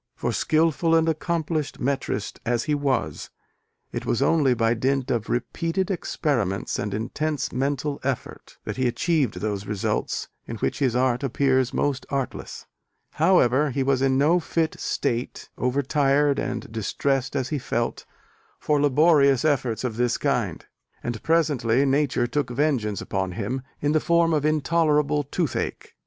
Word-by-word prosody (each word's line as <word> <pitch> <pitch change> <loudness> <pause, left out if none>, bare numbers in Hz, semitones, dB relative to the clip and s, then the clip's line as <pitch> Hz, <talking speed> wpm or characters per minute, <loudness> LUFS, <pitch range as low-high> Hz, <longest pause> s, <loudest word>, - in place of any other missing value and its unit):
For, - - -2
skilful 165 +1 +2
and 165 0 +3
accomplished 160 -2 -1
metrist 135 -5 -2
as 120 -1 0
he 155 -1 -1
was, 140 -4 -1 0.6
it - - -4
was 120 - 0
only 140 -2 +3
by 115 0 +2
dint 130 +2 0
of 115 -3 -1
"repeated 165 +9 -1
experiments 120 - -1
and 105 - -2
intense 140 +7 -2
mental 140 +2 -1
effort" 135 -2 -4
that - - -5
he 130 -1 +2
achieved 145 - +1
those 100 -2 -3
results 105 -2 -2 0.2
in 115 - -5
which 110 - -2
his 130 -4 +1
art 125 -1 +2
appears 130 -1 +1
most 140 -2 -1
artless. 135 -2 -4 0.5
However, 150 -4 +3
he 135 +1 -1
was 135 -1 +1
in 135 -1 +3
no 155 +6 +4
fit 165 -1 -1
state, 120 -3 -2
over 125 +3 0
tired 140 0 +2
and 120 -4 -4
distressed 135 +5 -1
as 130 -2 -1
he 150 - -1
felt, 120 -2 -2 0.5
for 150 -1 +1
laborious 145 -1 +4
efforts 130 -7 0
of 115 -3 -3
this 120 -1 +1
kind: - - -1 0.4
and 120 -3 -4
presently 140 -6 +2
Nature 135 -3 +2
took 130 +2 -1
vengeance 125 -6 0
upon 95 -2 -2
him 115 +7 -3 0.2
in 145 - +1
the 155 - +3
form 170 0 +2
of 150 -1 +1
intolerable 150 -1 +2
toothache. 145 +1 -3
135 Hz, 150 wpm, -24 LUFS, 120-150 Hz, 0.6 s, no